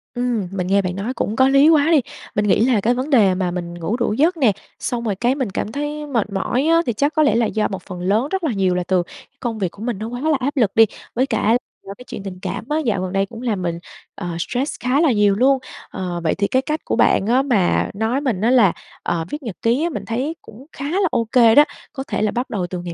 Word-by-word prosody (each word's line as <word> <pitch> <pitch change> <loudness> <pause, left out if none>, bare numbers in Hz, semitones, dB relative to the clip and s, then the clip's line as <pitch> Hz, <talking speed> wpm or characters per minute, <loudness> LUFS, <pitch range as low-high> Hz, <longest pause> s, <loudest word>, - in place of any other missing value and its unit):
Ừm, 240 -5 -1
mình 185 -2 -3
nghe 200 +1 +3
bạn 180 -1 -3
nói 205 +6 -3
cũng 215 - -2
có 260 +1 +4
lý 275 +3 +5
quá 310 -2 +4
đi. 310 -4 +5 0.3
Mình 210 0 +1
nghĩ 210 +3 +4
là 245 -5 +2
cái 235 +5 +2
vấn 255 +4 -3
đề 215 -9 +5
mà 180 -1 -1
mình 175 -1 -5
ngủ 175 +7 -3
đủ 235 -3 0
giấc 325 +9 +2
nè, 255 -8 +4 0.3
xong 240 -3 -3
rồi 210 -4 -1
cái 245 +6 +1
mình 260 -7 -2
cảm 205 - -3
thấy 295 +2 -4
mệt 230 -7 -1
mỏi 200 +7 0
á, 330 0 +4
thì 240 - 0
chắc 285 +8 0
có 310 - +4
lẽ 285 - +3
là 235 0 +3
do 215 0 0
một 195 - -6
phần 180 -3 -8
lớn 210 +8 +1
rất 385 -2 -1
là 310 - +1
nhiều 190 -3 +1
là 180 - 0
từ 185 -2 +2
cái - - -15
công 230 -3 -3
việc 185 -4 -1
của 205 - -11
mình 235 -3 -2
nó 220 - -4
quá 245 +2 -6
là 310 -1 +2
áp 280 +3 -2
lực 220 -6 +3
đi. 225 - +7 0.3
Với 255 +3 +2
cả 230 -3 +2 0.3
do 195 - -6
cái 250 - -13
chuyện 200 - -7
tình 185 -2 -7
cảm - - -4
á, 300 - +1
dạo 205 -6 0
gần 185 0 -4
đây 195 0 +2
cũng 230 +3 -10
làm 215 -7 -1
mình, 170 -1 -2 0.4
ờ, 185 - -6
stress 250 - -2
khá 255 +4 +1
là 315 -6 +4
nhiều 205 -2 +3
luôn. 265 +5 +3 0.3
Ờ, 180 -2 -4
vậy 160 - +1
thì 200 0 0
cái 260 +4 +1
cách 305 +3 -2
của - - -1
bạn - - +3
á 250 +3 +4
mà 230 -10 +1
nói 220 +6 -1
mình 240 -10 -1
á, 230 - +3
là, 225 -9 +5 0.3
ờ, 165 -1 -1
viết 295 0 -6
nhật 220 -7 -5
ký 240 +6 +2
á, 340 - +1
mình 320 - -5
thấy 260 +8 -2
cũng 235 +5 -14
khá 275 - -7
là 380 +1 +2
ô 230 - +1
kê 230 -3 +6
đó. 290 - +9 0.3
Có 270 -2 -5
thể - - -2
là 215 -1 +1
bắt 245 +2 -3
đầu 185 -5 -2
từ 180 0 -5
ngày 175 -1 -6
230 Hz, 285 wpm, -20 LUFS, 195-270 Hz, 0.4 s, đó